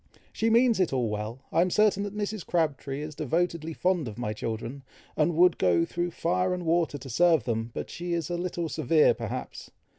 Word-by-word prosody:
"She 225 - +1
means 235 -1 +4
it 185 - +2
all 125 -4 0
well. 105 +4 -4
I - - +3
am 180 - +2
certain 210 +1 +3
that 205 0 -5
Mrs. 210 -2 -3
Crabtree 145 -4 -1
is 155 0 -6
devotedly 165 +2 -1
fond 180 -4 0
of 110 -1 -7
my 110 -3 -2
children, 115 +5 -5 0.3
and 160 +2 +1
would 180 +1 +4
go 85 -2 +3
through 175 - -2
fire 180 +2 0
and 180 -1 -6
water 165 -3 +1
to 135 - -10
serve 160 +2 +3
them; 115 -1 -2
but - - -5
she 175 0 -4
is 165 -3 -1
a - - 0
little 175 -1 -3
severe 155 0 +3
perhaps. 120 +2 -6
165 Hz, 205 wpm, -27 LUFS, 130-180 Hz, 0.3 s, means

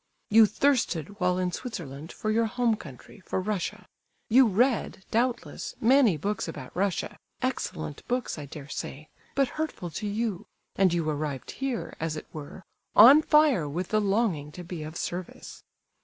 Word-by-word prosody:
You 220 0 +8
thirsted, 205 - 0
while 180 -1 +2
in 180 -1 0
Switzerland, 165 - -6
for 215 - -2
your 225 +1 +2
home 240 0 +1
country, 140 - -12
for 190 - -3
Russia; 190 -1 -3 0.4
you 255 +2 +7
read, 220 -2 +1
doubtless, 240 +2 -1
many 240 - +5
books 205 +6 -2
about 130 -6 -8
Russia, 195 0 -1 0.3
excellent 75 -2 -3
books, 250 -1 -1
I 145 - -7
dare 140 0 -9
say, 150 +1 -6 0.3
but 275 -1 +3
hurtful 185 - -4
to 210 +7 -4
you; 210 -2 -2 0.3
and 190 -2 +4
you 170 -2 0
arrived 150 -3 -3
here; 270 -3 -4
as 160 -1 -2
it - - -7
were, 155 +5 -8 0.3
on 265 +8 +10
fire 300 - +4
with 175 +5 -3
the 215 0 +2
longing 195 -8 0
to 180 - -8
be 175 -2 -6
of 155 +1 -7
service. 180 0 -6
195 Hz, 160 wpm, -27 LUFS, 160-230 Hz, 0.4 s, on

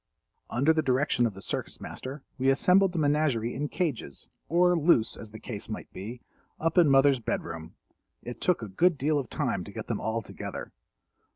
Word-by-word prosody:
Under 140 +6 +3
the 160 - +2
direction 130 -3 +2
of 105 - -7
the 95 - -9
Circus - - -4
Master 135 +2 -7 0.2
we 130 +1 +3
assembled 180 +7 +4
the - - -3
menagerie 145 -6 +1
in 145 +4 -3
cages, 145 - -3 0.2
or 180 +2 +4
loose 150 -9 +3
as 110 - -9
the 110 +1 -10
case 105 -3 -6
might 110 - -7
be, 115 +6 -7 0.4
up 165 0 0
in 165 -4 +6
Mother's 135 -1 +5
bed 115 - -2
room. 80 -1 -8 0.5
It 120 - -7
took 180 -10 +1
a - - -4
good 160 - +2
deal 145 +2 +1
of 130 - -5
time - - -1
to - - -10
get - - -6
them - - -3
all 115 0 -1
together. - - -7
135 Hz, 195 wpm, -28 LUFS, 115-155 Hz, 0.5 s, in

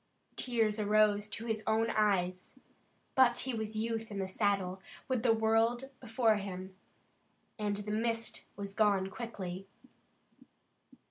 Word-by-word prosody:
Tears 225 -4 +1
arose 210 0 +3
to 215 +3 -4
his 220 -2 -1
own 225 +1 +2
eyes, 185 -3 +1 0.6
but 255 -2 +5
he 260 - -3
was 220 -1 -3
youth 225 0 -2
in 205 - -6
the 190 -1 -1
saddle, 190 -2 0 0.3
with 255 -3 0
the 235 -1 +4
world 225 +4 +2
before 225 -2 +2
him, 190 -1 -6 0.8
and 205 -1 0
the 205 0 -4
mist 230 +1 -1
was 200 -1 -6
gone 200 -2 +2
quickly. 195 -5 -6
215 Hz, 130 wpm, -33 LUFS, 200-225 Hz, 0.8 s, but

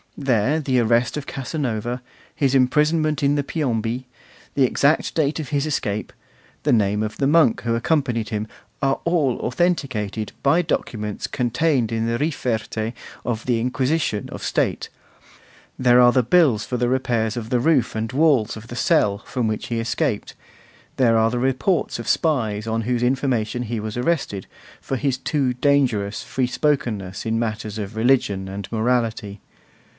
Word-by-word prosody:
There 135 +2 +1
the 130 -4 +1
arrest 120 +1 +2
of 150 -2 -4
Casanova, 125 -4 -3 0.3
his 140 -2 +1
imprisonment 150 +3 +2
in 140 +1 +3
the 145 - 0
Piombi, 125 -4 -2 0.5
the 140 - +4
exact 140 +5 +2
date 155 -1 +1
of 150 - -5
his 145 -1 0
escape, 110 -9 -2 0.5
the - - +3
name 105 -2 +2
of 105 -1 -3
the 135 - +1
monk 155 -6 +4
who 115 0 0
accompanied 120 -4 0
him, 105 0 -3 0.3
are 135 -1 +1
all 155 -7 +2
authenticated 120 - -1
by 165 +6 +4
documents 105 -9 -3
contained 125 0 0
in 115 0 -1
the 115 0 0
'riferte' 115 -6 -2 0.3
of 115 -2 -3
the 120 -2 +1
Inquisition 130 -2 0
of - - -8
State; - - -1 0.9
there 125 -1 +5
are 120 0 +7
the 130 0 +3
bills 120 -6 +3
for 125 - -2
the 120 0 +1
repairs 120 -4 0
of 115 -1 -5
the 125 - +2
roof 130 -4 +2
and 110 +2 -2
walls 135 -7 +2
of 110 +1 -11
the 120 - -8
cell 100 -3 +2
from 120 +3 -2
which 110 0 -3
he 115 -1 -2
escaped; 115 +1 -1 0.6
there 115 -3 +4
are 110 0 +3
the 125 - -1
reports 135 +5 0
of 115 - -6
the - - -3
spies 110 -10 0
on 115 0 0
whose 120 +1 -1
information 125 -3 0
he 115 -1 -3
was 110 +1 -5
arrested, 125 - -1 0.4
for 135 - -3
his 135 -1 0
too 135 -1 0
dangerous 125 -7 +1
free 130 -2 -1
spokenness 120 -9 -1
in 115 0 0
matters 110 -2 -3
of 105 0 -5
religion 110 -5 +2
and 95 0 -7
morality. 115 -3 -1
120 Hz, 165 wpm, -22 LUFS, 110-140 Hz, 0.9 s, are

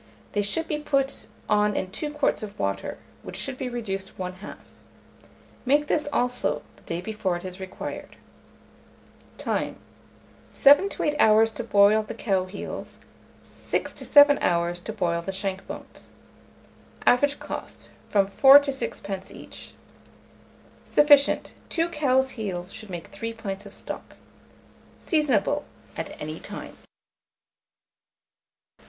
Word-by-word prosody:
They 205 - +1
should 320 +11 -2
be 300 - -2
put 275 -2 0 0.2
on 210 -1 +2
in 185 - -2
2 295 +8 -4
quarts 295 -1 0
of 210 -2 -7
water, 100 0 -2 0.2
which - - -8
should 270 - -2
be 255 0 -4
reduced 195 -6 -4
one 185 -1 -4
half. 190 +3 -10 1.1
Make 290 +3 +3
this 300 0 0
also 250 0 0
the - - -22
day 170 +1 -4
before 205 -4 -2
it 175 - -10
is 185 0 -7
required. 190 -1 -7 1.2
Time. - - -2 0.7
7 290 +8 +6
to - - -3
8 295 - +1
hours 220 -1 +5
to 230 - -5
boil 205 -1 +5
the 215 +1 -7
cow 195 -5 0
heels, 190 +2 -7 0.4
6 - - -3
to - - -6
7 290 -1 +7
hours 170 0 +1
to 180 - -6
boil 175 -5 -1
the 195 - -4
shank 190 0 -3
bones. - - -9 1.0
Average 285 +3 +4
cost, - - -8 0.2
from 200 -2 +3
4d. 270 +8 +8
to 280 - -1
6d. 200 -7 -5
each. - - -11 1.1
Sufficient. 290 -1 +4 0.2
2 335 +1 0
cow 280 -5 +2
heels 200 -8 -5
should 220 -2 -9
make 175 -2 -6
3 230 0 -5
pints 200 -3 -6
of 200 - -12
stock. - - -8 0.8
Seasonable 290 - +1 0.3
at - - -6
any - - -5
time. - - -8
215 Hz, 135 wpm, -25 LUFS, 190-275 Hz, 1.2 s, 4d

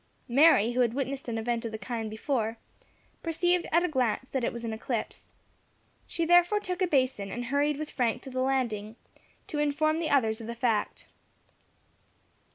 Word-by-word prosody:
Mary, 245 -4 +5
who 245 - -2
had 240 -1 +2
witnessed 275 0 -3
an 230 -1 -2
event 230 +1 -1
of 230 - -4
the 220 - -4
kind 225 -1 -4
before, 225 0 -2 0.6
perceived 350 +2 +1
at 340 +2 +4
a - - +2
glance 260 -4 -1
that 265 -2 -1
it - - +1
was 235 0 -7
an 225 - -3
eclipse. 220 - -4 0.8
She 335 - -1
therefore 350 +4 +5
took 365 -2 -4
a 370 - +3
basin, 255 - +1
and 245 +3 -4
hurried 285 +3 +1
with 305 0 -5
Frank 240 -4 0
to 265 - -9
the 255 0 -2
landing, 235 -5 -1 0.5
to 295 - -4
inform 310 +2 +1
the 330 - -1
others 225 -5 +2
of 225 - -8
the 235 - -5
fact. 230 -3 -1
255 Hz, 180 wpm, -28 LUFS, 230-305 Hz, 0.8 s, Mary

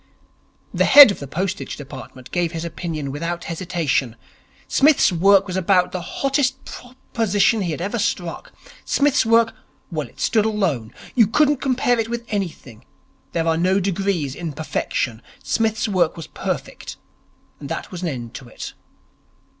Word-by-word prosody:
The 185 +1 +2
head 280 -5 +10
of - - -6
the 140 - -7
Postage 190 +6 -3
Department 130 -2 -10
gave 175 -1 -1
his 165 0 -4
opinion 160 -4 -4
without 170 +4 -4
hesitation. 165 -8 -1 0.5
Psmith's 290 -6 +4
work 195 +3 +4
was 185 -2 -5
about 185 -1 +2
the 180 - -4
hottest 270 +5 -1
proposition 225 -4 -1
he 180 - -1
had 155 0 -4
ever 205 +6 -2
struck. 175 -4 -3 0.3
Psmith's 285 -4 +2
work 230 0 +4 0.4
well, - - -3
it - - -21
stood 220 -3 +2
alone. 180 - -1 0.2
You 230 -5 +5
couldn't 295 +6 +3
compare 250 -3 +1
it 225 0 -1
with 235 0 -4
anything. 170 - -5 0.5
There 165 -1 0
are 160 0 +2
no 185 +3 +2
degrees 190 -6 -1
in 165 0 -5
perfection. 130 -6 -2 0.2
Psmith's 225 0 0
work 180 -6 +1
was 165 - -6
perfect, - - -5 0.6
and 140 - -8
there - - -3
was 180 -2 -6
an 180 - -2
end 120 -6 -5
to 130 - -9
it. 120 - -8
185 Hz, 155 wpm, -21 LUFS, 160-225 Hz, 0.6 s, head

